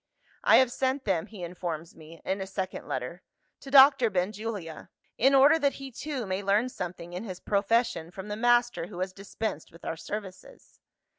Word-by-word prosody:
'I - - +6
have 260 -2 +5
sent 265 +2 -1
them, 185 -6 0
(he 205 -5 -9
informs 170 -2 -5
me, 160 +1 -14
in 195 +1 -1
a 190 - -4
second 190 -1 -5
letter) 130 +8 -4 0.4
to 275 - -10
Doctor 270 -3 +7
Benjulia; 195 -2 -4 0.3
in 270 +4 +4
order 285 +4 +6
that 280 -2 +2
he 275 -1 -8
too 270 -1 -4
may 190 0 -2
learn 205 +5 +2
something 175 -5 -7
in 180 +4 -5
his 185 -5 -7
profession 200 -4 +1
from 190 +3 -9
the 210 - -3
master 240 -4 +2
who 180 - -10
has 185 0 -2
dispensed 195 -3 -5
with 165 - -15
our - - -2
services. 200 0 -8
200 Hz, 180 wpm, -28 LUFS, 180-240 Hz, 0.4 s, Doctor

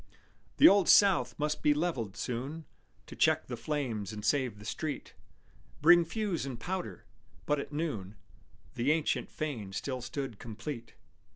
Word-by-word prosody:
"The 310 - +9
Old 200 - +5
South 175 -12 +5
must 150 0 -1
be 150 -1 +4
levelled 130 - -2
soon 135 +9 -4 0.4
To - - -10
check - - +3
the - - -5
flames 125 -9 -3
and 105 -1 -6
save 125 -2 +1
the 105 - -12
street; 150 +5 -4 0.7
Bring 170 +2 +7
fuse 200 0 -2
and 135 -3 -5
powder." 175 - -5 0.4
But 150 -1 +1
at 140 - -6
noon 135 - -3 0.6
The 125 +5 +1
ancient 155 -1 0
fane 120 -11 -5
still 130 +4 -3
stood 120 -2 -5
complete. 115 +1 -7
140 Hz, 150 wpm, -31 LUFS, 115-160 Hz, 0.7 s, The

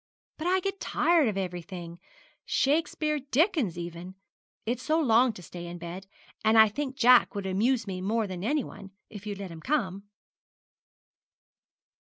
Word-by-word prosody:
'But 320 - -2
I 375 +1 +2
get 390 +1 -3
tired 335 -5 +2
of 210 -3 -1
everything 175 -2 -5 0.4
Shakespeare, 305 +1 +1
Dickens, 280 - +1
even. 175 +2 -7 0.5
It's 240 +2 -2
so 315 +4 +1
long 250 -3 +4
to 180 - -11
stay 175 0 -8
in 175 0 -7
bed; 175 +3 -8 0.4
and 220 +1 +4
I 220 -1 +8
think 270 +4 -4
Jack 250 -2 +5
would 200 -1 -3
amuse 225 +5 +1
me 185 -2 -5
more 220 +3 0
than 185 -2 -6
anyone, 235 -6 -3 0.2
if 205 0 -9
you'd 205 -1 -4
let 195 -3 -7
him 165 -1 -10
come.' 200 - -1
215 Hz, 155 wpm, -28 LUFS, 185-275 Hz, 0.5 s, I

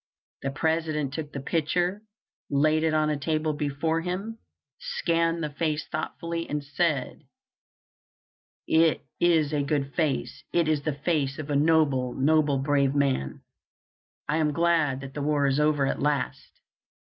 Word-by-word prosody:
The 135 - -2
President 155 -1 -1
took 150 -1 -5
the 140 - -5
picture, 175 +6 0 0.5
laid 155 +2 +3
it 160 -1 +1
on 155 0 +2
a 150 - -2
table 155 +1 0
before 150 +3 -1
him, 195 +6 -4 0.4
scanned 165 0 0
the 150 - -3
face 155 0 -1
thoughtfully, 165 +2 -4
and 150 -1 -2
said: 145 -1 -1 1.4
"It 160 0 +3
is 160 -4 +3
a 145 - +1
good 140 -1 -1
face; 155 -5 -1
it 170 -2 +2
is 155 -2 +1
the 150 -1 -2
face 145 -2 -1
of 155 -1 -5
a - - +1
noble, 140 -4 +2
noble, 145 +1 +3
brave 140 0 +1
man. 135 - 0 0.9
I 150 +1 +1
am 155 -2 +1
glad 160 -5 +2
that 135 -1 -8
the 145 - -4
war 145 0 +1
is 135 +1 +2
over 150 -2 +2
at - - -2
last." 145 -1 -1
150 Hz, 150 wpm, -26 LUFS, 140-160 Hz, 1.4 s, laid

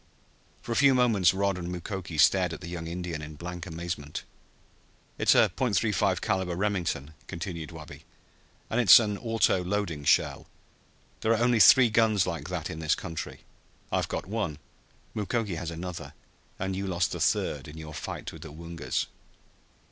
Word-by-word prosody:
For - - -6
a - - 0
few 140 +2 +5
moments 110 -8 +4
Rod 100 -1 0
and 90 0 -5
Mukoki 90 -1 -5
stared 90 +3 +4
at 80 - -8
the 90 - -7
young 85 -1 -5
Indian 85 -2 -4
in 75 0 -8
blank 90 +2 -7
amazement. 80 -3 -5 1.0
"It's - - +5
a - - +5
.35 110 -5 +1
caliber 95 -2 -1
Remington," 85 -7 -2
continued 85 -2 -5
Wabi, 75 -2 -11 0.7
"and 125 - +2
it's 105 -3 +10
an 105 -3 -1
auto 115 -5 +2
loading 90 -5 -2
shell. 70 - +2 0.7
There 110 - +2
are - - +2
only 120 -1 +3
three 120 +3 +8
guns 110 -4 +3
like 85 0 -4
that 90 -3 -3
in 80 - -6
this 80 -1 +1
country. 80 -3 -6 0.5
I've - - 0
got - - -4
one, 100 -7 -3 0.6
Mukoki 105 -1 -1
has 85 0 -4
another 85 -3 -6 0.4
and 95 +1 -2
you 100 +1 -3
lost 90 -1 0
the - - -4
third 70 -3 0
in 75 +2 -10
your 80 -1 -8
fight 70 - -6
with - - -11
the - - -9
Woongas!" 85 +2 -3
90 Hz, 165 wpm, -28 LUFS, 80-105 Hz, 1.0 s, it's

